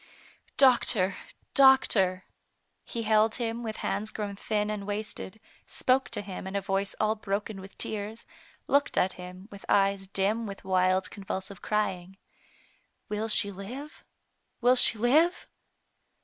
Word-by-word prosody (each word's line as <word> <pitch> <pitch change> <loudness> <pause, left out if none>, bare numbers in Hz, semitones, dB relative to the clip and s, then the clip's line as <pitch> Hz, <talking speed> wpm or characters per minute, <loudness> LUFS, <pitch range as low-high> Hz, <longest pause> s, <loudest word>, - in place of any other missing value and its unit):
" - - -29
Doctor! 210 -6 +3 0.4
doctor! 210 -9 +4 0.3
*' - - -48
He 230 - -2
held 220 0 +3
him 235 -1 -3
with 220 -2 -5
hands 215 +1 -1
grown 205 -2 -5
thin 210 +1 -1
and 205 -2 -5
wasted, 210 0 -5 0.3
spoke 260 +1 +1
to - - -3
him 190 -1 -7
in 190 - -6
a - - +2
voice 195 +1 -1
all 215 0 +2
broken 205 -1 -4
with 195 +1 -13
tears, 215 +1 -3 0.4
looked 285 0 +1
at 185 - +3
him 180 +2 -10
with 200 -1 -11
eyes 195 -1 +2
dim 205 +4 0
with 195 -1 -8
wild, 185 0 +2
convulsive 195 -1 -6
crying: 190 -3 -2 0.5
" - - -38
Will 210 +1 -2
she 205 -2 +1
live? 245 - -9 0.6
will 245 +2 +4
she 245 -2 +4
live 310 +10 +3
205 Hz, 150 wpm, -28 LUFS, 195-225 Hz, 0.6 s, doctor